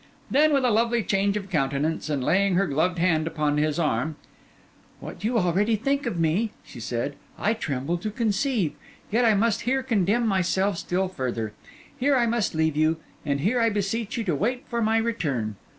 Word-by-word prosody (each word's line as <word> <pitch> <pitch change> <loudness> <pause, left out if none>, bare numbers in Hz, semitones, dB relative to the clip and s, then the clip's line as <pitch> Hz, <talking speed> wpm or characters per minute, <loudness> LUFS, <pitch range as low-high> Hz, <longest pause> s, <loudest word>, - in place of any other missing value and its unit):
Then, 305 +3 +4
with 275 -3 +3
a 245 - +3
lovely 230 +1 +2
change 200 +1 +1
of 200 -1 -7
countenance, 150 +1 0
and 140 -4 -1
laying 195 +5 +2
her 195 +2 +3
gloved 170 +4 0
hand 165 -2 +2
upon 150 -2 0
his 150 0 +1
arm— 155 -1 0 0.8
'What - - -9
you 230 +3 +1
already 200 +4 +2
think 275 +6 -1
of 175 - -2
me,' 165 +8 +1
she 125 - -11
said, 120 +4 -3 0.2
'I 215 - +1
tremble 160 - -2
to 215 - -3
conceive; 220 - 0 0.4
yet 235 +3 +3
I 220 -2 +5
must 220 +1 +1
here 265 +2 0
condemn 225 -1 +1
myself 190 -1 +1
still 185 +2 -1
further. 120 - -3 0.4
Here 280 +1 +2
I 245 -2 +3
must 230 -6 0
leave 160 -1 +1
you, 155 +1 +2 0.3
and 140 -1 0
here 235 - +2
I 230 - +4
beseech 210 +3 -2
you 230 - -1
to 180 -6 0
wait 245 - -1
for 235 -1 -2
my 220 0 +2
return. 145 - -1
195 Hz, 190 wpm, -25 LUFS, 155-230 Hz, 0.8 s, I